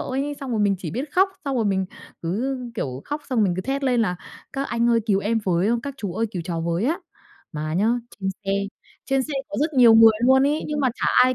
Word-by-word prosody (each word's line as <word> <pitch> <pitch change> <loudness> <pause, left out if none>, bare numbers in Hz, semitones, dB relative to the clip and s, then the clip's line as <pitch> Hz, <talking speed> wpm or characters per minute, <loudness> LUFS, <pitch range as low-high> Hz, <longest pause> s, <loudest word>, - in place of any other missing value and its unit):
ấy, 275 +3 -2
xong 275 -2 -5
rồi 225 -3 0
mình 200 -1 +3
chỉ 170 -4 -5
biết 265 - -4
khóc. 380 +2 +4 0.2
Xong 275 -2 -1
rồi 230 - +1
mình 190 -2 +1 0.4
cứ, 225 +11 -1 0.2
kiểu, 135 - -4
khóc, 295 +1 -4
xong 255 - +1
rồi 215 - +5
mình 180 -3 +1
cứ - - -1
thét 275 +3 -2
lên 250 -3 +2
là 180 -5 -1 0.4
"Các 270 - -2
anh 235 0 +1
ơi 230 -1 +4
cứu 200 -3 +2
em 225 +3 0
với, 185 +3 +2
các 280 +1 -5
chú 205 -9 -4
ơi 225 +3 0
cứu 180 -5 -4
cháu 165 -1 -3
với 170 +4 -1
á." 320 +8 +1 0.5
Mà 155 0 -3
nhá, 200 +5 +2 0.3
trên 190 - -1 0.2
xe 195 - -1 0.5
trên 270 -1 +1
xe 295 - -6 0.2
có 300 - -5
rất 305 +2 +1
nhiều 240 -3 +7
người 225 0 +8
luôn 265 +1 +6
ấy, 295 +2 0
nhưng 300 -1 -2
mà 265 - +3
chả - - -2 0.2
ai 255 0 +2
230 Hz, 260 wpm, -23 LUFS, 190-270 Hz, 0.5 s, người